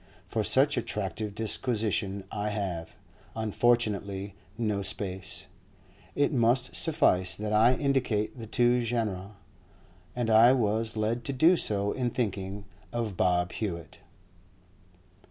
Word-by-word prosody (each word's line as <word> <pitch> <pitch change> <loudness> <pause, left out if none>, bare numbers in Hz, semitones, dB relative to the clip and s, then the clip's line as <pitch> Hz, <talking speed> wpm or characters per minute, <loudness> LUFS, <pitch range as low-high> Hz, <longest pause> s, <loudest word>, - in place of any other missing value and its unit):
For - - -2
such - - +3
attractive 100 +1 -3
disquisition 110 -3 -1
I 105 0 -2
have, 90 -6 -4 0.4
unfortunately, 105 -3 0 0.2
no 105 -4 -1
space; 95 -1 +1 0.7
it 145 +1 +1
must 125 +1 +2
suffice 95 - +2
that 105 0 -3
I 115 +4 +5
indicate 125 -6 0
the 110 - -7
two 120 +1 +2
genera. 105 -4 -3 0.8
And 120 -2 -1
I 115 +3 +7
was 110 -2 0
led 115 +3 -1
to 140 - -2
do 160 +8 +5
so 100 - 0
in 125 -2 -1
thinking 100 -4 -3 0.3
of 115 -4 -3
Bob 90 0 +1
Hewett. 85 -7 -5
110 Hz, 120 wpm, -28 LUFS, 100-120 Hz, 0.8 s, I